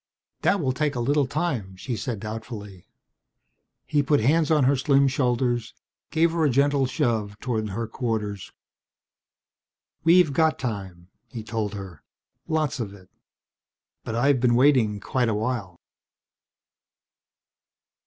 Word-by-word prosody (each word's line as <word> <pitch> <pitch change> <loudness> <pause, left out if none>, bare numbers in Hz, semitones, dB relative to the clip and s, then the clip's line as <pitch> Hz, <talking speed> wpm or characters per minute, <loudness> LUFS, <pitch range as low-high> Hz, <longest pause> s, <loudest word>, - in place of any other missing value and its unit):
"That 200 - +2
will 135 -6 0
take 145 +2 -1
a - - -2
little 140 +3 +1
time," 130 - -2
she 120 +5 -4
said 115 -2 -4
doubtfully. 105 -3 -7 1.0
He 150 -1 +2
put 145 +1 +2
hands 150 +7 +2
on 155 -3 +4
her 135 +2 +4
slim 140 +1 +3
shoulders, 125 -2 0 0.3
gave 165 +1 +2
her 165 -1 0
a 150 - +4
gentle 140 +1 +2
shove 110 -5 -1
toward 110 -4 -2
her 115 +4 -3
quarters. 110 -4 -3 1.5
"We've 165 -2 +5
got 160 +1 +2
time," 95 -7 -5 0.2
he 115 -4 -7
told 110 -2 -3
her. 95 -6 -9 0.5
"Lots 155 -4 -1
of 100 -4 -4
it. 95 -2 -18 0.9
But 110 - -4
I've 130 +3 +3
been 120 -1 +3
waiting 125 -6 +3
quite 120 +4 0
a 110 - 0
while." 105 -5 -3
120 Hz, 135 wpm, -25 LUFS, 105-145 Hz, 1.5 s, We've